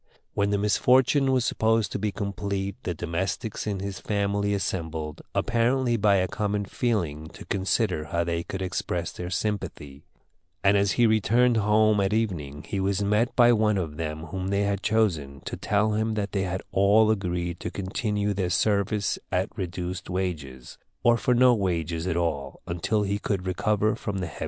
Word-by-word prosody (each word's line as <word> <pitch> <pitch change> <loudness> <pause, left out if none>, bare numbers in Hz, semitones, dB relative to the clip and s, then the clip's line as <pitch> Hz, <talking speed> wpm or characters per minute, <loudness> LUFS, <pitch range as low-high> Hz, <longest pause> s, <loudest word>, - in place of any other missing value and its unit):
When 100 0 +1
the 100 - +1
misfortune 130 +6 +3
was 130 -2 +2
supposed 110 -2 +1
to - - -3
be 105 +1 -1
complete 100 -1 -3
the 90 - -3
domestics 90 +8 -3
in 100 -2 -2
his 100 -1 -5
family 100 0 0
assembled, 80 -5 -3
apparently 120 +1 +2
by 105 -2 +3
a 95 -1 +2
common 105 +2 -2
feeling, 85 -10 -1
to - - -11
consider 95 -4 0
how 85 +2 -1
they 85 0 -1
could 95 +2 -5
express 90 -2 -2
their 90 0 -6
sympathy; 90 -8 -4 0.6
and 100 +1 +5
as 100 -1 +2
he 120 - +3
returned 115 +3 +3
home 110 0 +3
at 100 +1 +1
evening 80 -11 -2
he 100 - -2
was 100 +1 0
met 105 +4 +1
by 120 -1 +6
one 105 -2 +2
of 80 -5 -3
them 80 -1 -4
whom 95 +3 -5
they 100 +1 +1
had 100 -1 -1
chosen, 85 -12 0
to - - -5
tell 105 +1 +1
him 110 +1 0
that 105 -2 -2
they 95 -1 0
had 95 0 -3
all 105 +3 +4
agreed 90 -4 -2
to - - -4
continue 105 +1 -2
their 95 -2 -1
service 100 +1 +1
at 95 +2 -1
reduced 90 -1 -4
wages, 80 -9 -4 0.2
or 120 0 +5
for 125 +1 +1
no 125 0 +6
wages 85 -5 -1
at 85 - 0
all, 75 -6 -2
until 95 +5 0
he 100 0 -1
should 95 -3 -1
recover 105 +3 +1
from 100 -1 -4
the 95 - -2
heavy 80 - -8
loss. - - -11
100 Hz, 180 wpm, -26 LUFS, 90-105 Hz, 0.6 s, by